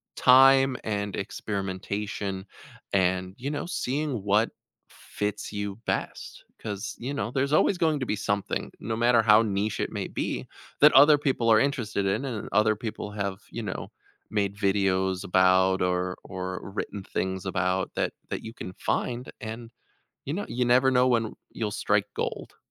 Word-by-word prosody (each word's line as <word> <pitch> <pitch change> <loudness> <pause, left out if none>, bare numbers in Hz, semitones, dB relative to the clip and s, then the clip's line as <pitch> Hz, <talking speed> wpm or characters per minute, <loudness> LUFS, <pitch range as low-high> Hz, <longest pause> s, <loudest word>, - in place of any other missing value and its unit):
time 135 0 +6
and 100 -2 -2
experimentation 100 0 -4 0.5
and, 95 0 +1
you 135 +3 -4
know, 145 - -3
seeing 140 - -2
what 105 +3 +3 0.4
fits 105 0 -5
you 100 -1 -4
best, - - -3 0.2
'cause, 100 -2 -5
you 130 +4 -4
know, 120 -5 -2
there's 140 +2 0
always 180 +4 +4
going 160 -4 +1
to 130 - 0
be 105 - -1
something, 100 -1 -2
no 110 +2 -3
matter 120 0 +4
how 110 0 +6
niche 105 +1 -1
it - - -1
may - - -3
be, - - -3 0.4
that 150 - +9
other 145 +2 +8
people 130 -5 0
are 110 - +7
interested 110 -7 0
in 105 +8 0
and 120 -6 -4
other 110 +1 +3
people 105 -1 -5
have, 100 -2 -3
you 115 - -5
know, 95 -3 -5 0.4
made 100 -2 0
videos 95 -2 +1
about 95 +1 +4
or 90 0 0
or 95 0 -5
written 105 -1 -4
things 95 0 -3
about 95 0 0
that - - -1 0.2
that - - -4
you 110 - -7
can 90 - -7
find 125 +6 -2
and, 115 +1 -7 0.6
you 145 - -1
kno 205 +3 -2
you 125 +1 0
never 125 +2 +4
know 125 0 +4
when 115 -2 +3
r - - -8 0.2
you'll 110 -2 -2
strike 105 -1 +1
gold. - - -4
105 Hz, 165 wpm, -27 LUFS, 95-125 Hz, 0.6 s, that